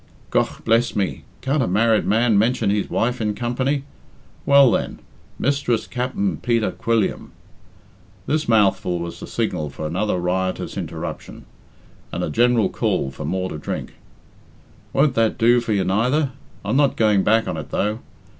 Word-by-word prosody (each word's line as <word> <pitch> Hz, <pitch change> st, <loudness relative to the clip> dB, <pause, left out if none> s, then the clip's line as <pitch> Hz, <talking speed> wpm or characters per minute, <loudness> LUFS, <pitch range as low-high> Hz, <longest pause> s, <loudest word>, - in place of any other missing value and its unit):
"Gough -, -, 0 dB
bless 115 Hz, +1 st, +2 dB
me, 100 Hz, -2 st, -2 dB, 0.2 s
can't 140 Hz, +2 st, 0 dB
a -, -, +1 dB
married 110 Hz, +4 st, +2 dB
man 115 Hz, +1 st, +3 dB
mention 110 Hz, 0 st, +2 dB
his 105 Hz, -1 st, -1 dB
wife 125 Hz, +1 st, 0 dB
in 105 Hz, -1 st, -1 dB
company? 130 Hz, +4 st, -1 dB, 0.6 s
Well 140 Hz, -3 st, +7 dB
then. -, -, -1 dB, 0.4 s
Mistress 140 Hz, -4 st, 0 dB
Cap'n 160 Hz, +11 st, -2 dB
Peter 115 Hz, -2 st, 0 dB
Quilliam 115 Hz, -3 st, -1 dB, 0.5 s
" -, -, -30 dB
This 155 Hz, -3 st, -1 dB
mouthful 100 Hz, -4 st, +3 dB
was 85 Hz, 0 st, -6 dB
the -, -, -8 dB
signal 75 Hz, -1 st, -2 dB
for 75 Hz, -, -7 dB
another 90 Hz, +6 st, -1 dB
riotous 95 Hz, +1 st, -2 dB
interruption, -, -, -6 dB, 0.7 s
and -, -, -3 dB
a -, -, -2 dB
general 120 Hz, +2 st, +3 dB
call 65 Hz, -, -1 dB
for 65 Hz, -, -7 dB
more 95 Hz, 0 st, -2 dB
to 75 Hz, -, -6 dB
drink. -, -, -5 dB, 1.0 s
"Won't 140 Hz, 0 st, +3 dB
that 115 Hz, -2 st, +1 dB
do 120 Hz, +1 st, +4 dB
for 115 Hz, -, -4 dB
you 100 Hz, -2 st, +2 dB
neither? 125 Hz, +9 st, +1 dB, 0.3 s
I'm 130 Hz, -, +1 dB
not 140 Hz, -2 st, +3 dB
going 105 Hz, -3 st, +3 dB
back 115 Hz, +1 st, +3 dB
on -, -, -2 dB
it, -, -, -6 dB
though. 105 Hz, +3 st, -1 dB
115 Hz, 160 wpm, -21 LUFS, 100-125 Hz, 1.0 s, Well